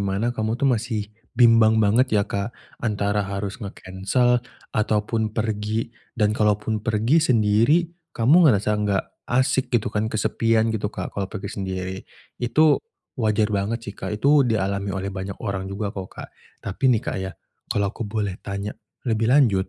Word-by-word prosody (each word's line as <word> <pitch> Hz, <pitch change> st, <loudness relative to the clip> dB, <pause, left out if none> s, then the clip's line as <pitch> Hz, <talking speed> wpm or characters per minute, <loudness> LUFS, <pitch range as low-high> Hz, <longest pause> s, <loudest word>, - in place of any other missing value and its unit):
mana 100 Hz, +3 st, -1 dB
kamu 110 Hz, 0 st, -1 dB
tuh 140 Hz, -, -2 dB
masih 110 Hz, -4 st, 0 dB, 0.2 s
bimbang 115 Hz, -2 st, +6 dB
banget 120 Hz, +6 st, +3 dB
ya, 100 Hz, -, +3 dB
Kak, 100 Hz, 0 st, -3 dB, 0.3 s
antara 105 Hz, -2 st, 0 dB
harus 100 Hz, +3 st, -4 dB
nge-cancel 100 Hz, +5 st, 0 dB, 0.3 s
ataupun 110 Hz, +1 st, 0 dB
pergi, 110 Hz, +1 st, -2 dB, 0.2 s
dan 105 Hz, -2 st, +2 dB
kalaupun 105 Hz, 0 st, +1 dB
pergi 115 Hz, +8 st, +2 dB
sendiri 115 Hz, +9 st, +3 dB, 0.2 s
kamu 150 Hz, +9 st, +6 dB
ngerasa 105 Hz, -4 st, +2 dB
enggak 100 Hz, -2 st, +1 dB, 0.2 s
asik 130 Hz, +1 st, +2 dB
gitu 120 Hz, -4 st, 0 dB
kan, 105 Hz, +1 st, 0 dB
kesepian 110 Hz, +1 st, +1 dB
gitu, 105 Hz, -2 st, -1 dB
Kak -, -, -6 dB
kalau 95 Hz, -1 st, -3 dB
pergi 105 Hz, -, -6 dB
sendiri, 95 Hz, -1 st, -3 dB, 0.4 s
itu 150 Hz, +6 st, +3 dB, 0.4 s
wajar 105 Hz, -1 st, +1 dB
banget 100 Hz, +3 st, 0 dB
sih, 100 Hz, -, -6 dB
Kak, 105 Hz, -, -5 dB
itu 140 Hz, +5 st, +4 dB
dialami 100 Hz, -2 st, -1 dB
oleh 95 Hz, +1 st, -3 dB
banyak 95 Hz, 0 st, -5 dB
orang 95 Hz, -2 st, -3 dB
juga 100 Hz, +1 st, -3 dB
kok, 95 Hz, -2 st, -6 dB
Kak. -, -, -10 dB, 0.4 s
Tapi 130 Hz, +8 st, 0 dB
nih, 120 Hz, -4 st, +4 dB
Kak, -, -, -3 dB
ya, 95 Hz, 0 st, -4 dB, 0.4 s
kalau 100 Hz, -1 st, 0 dB
aku 115 Hz, -3 st, -5 dB
boleh 100 Hz, -3 st, -3 dB
tanya 100 Hz, +1 st, -4 dB, 0.3 s
lebih 115 Hz, -2 st, +1 dB
lanjut, 120 Hz, -8 st, +4 dB
105 Hz, 160 wpm, -23 LUFS, 100-115 Hz, 0.4 s, bimbang